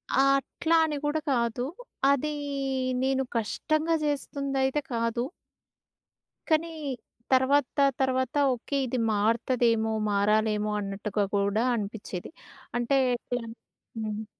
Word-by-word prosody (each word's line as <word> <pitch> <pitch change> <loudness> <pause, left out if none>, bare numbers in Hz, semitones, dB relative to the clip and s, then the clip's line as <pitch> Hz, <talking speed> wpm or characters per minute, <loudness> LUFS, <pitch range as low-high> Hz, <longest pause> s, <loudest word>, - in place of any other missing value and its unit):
ఆ! - - +4 0.2
అట్లా 325 +4 -1
అని 300 -2 -2
కూడా 295 +2 +1
కాదు, 235 0 0 0.5
అదీ 300 +2 +1 0.7
నేను 265 0 +2
కష్టంగా 310 +8 0
చేస్తుందైతే 275 -1 -1
కాదు. 230 +1 0 1.3
కనీ 315 +2 +3 0.7
తర్వాత 260 +1 +3 0.2
తర్వాత 260 +1 +1 0.2
ఓకె, 245 +4 -5
ఇది 250 0 -2
మారు‌త‌దేమో 225 +1 +2 0.2
మారాలేమో 210 +1 +2
అన్నట్టుగా 205 +1 -2
కూడా 200 +2 +2
అనిపించేది. 205 -4 -5 0.5
అంటే, 240 +3 +2 0.2
ఎట్లా 245 +1 -4 0.6
హ్మ్. 215 -1 -3
240 Hz, 95 wpm, -28 LUFS, 215-275 Hz, 1.3 s, ఆ